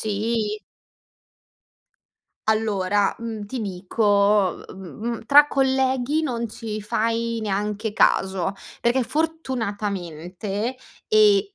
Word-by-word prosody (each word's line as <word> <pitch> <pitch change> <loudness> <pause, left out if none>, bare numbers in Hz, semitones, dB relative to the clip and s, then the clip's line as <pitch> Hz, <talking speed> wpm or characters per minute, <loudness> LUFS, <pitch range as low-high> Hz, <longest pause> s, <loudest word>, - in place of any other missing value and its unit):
Sì. 215 0 -1 1.9
Allora, 205 -2 +1
mhmm, 220 -3 -5
ti 255 +4 -5
dico, 200 0 +2
uhm, - - -11
mhmm, 220 +5 -5
tra 290 +4 +7
colleghi 265 +1 +1
non 235 -6 -2
ci 215 -1 -6
fai 230 +2 -1
neanche 210 +1 -2
caso, 190 0 +2 0.3
perché 245 +2 +3
fortunatamente 210 - -3 0.3
ehm 425 -2 +6
220 Hz, 90 wpm, -23 LUFS, 200-245 Hz, 1.9 s, tra